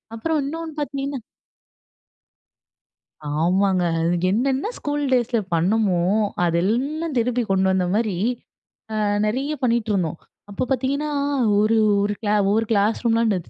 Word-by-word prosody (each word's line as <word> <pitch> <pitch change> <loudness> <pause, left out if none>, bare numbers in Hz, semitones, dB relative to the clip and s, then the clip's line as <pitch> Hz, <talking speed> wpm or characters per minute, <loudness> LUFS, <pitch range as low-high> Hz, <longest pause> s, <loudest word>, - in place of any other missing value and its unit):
அப்புறம் 310 +7 -1
இன்னொனு 325 +2 -5
பார்த்தீங்கன்னா 280 -1 -3 2.2
ஆமாங்க. 185 +2 +2 0.2
அது 170 +2 +1
என்னென்ன 270 - 0
ஸ்கூல் 290 0 -2
டேஸில 240 -2 +2
பண்ணோமோ 185 +1 +2 0.4
அதெல்லாம் 255 - 0
திருப்பி 240 +1 +1
கொண்டு 190 0 +2
வந்த 185 -1 +1
மாரி 215 -5 0 0.8
அ - - -2 0.3
நெறிய 265 +8 -1
பண்ணிட்டுருந்தோம். 210 -9 0 0.3
அப்ப 200 - -2
பார்த்தீங்கன்னா 275 +4 0 0.5
ஒரு, 220 +2 +3 0.3
ஒரு 205 0 0
கிளா 210 -1 +1
ஒவ்வொரு 220 +2 +2
கிளாஸ் 210 +1 +2
ரூம்லாம் 230 0 +3
அந்த 195 -3 +1
225 Hz, 115 wpm, -22 LUFS, 195-275 Hz, 2.2 s, ஒரு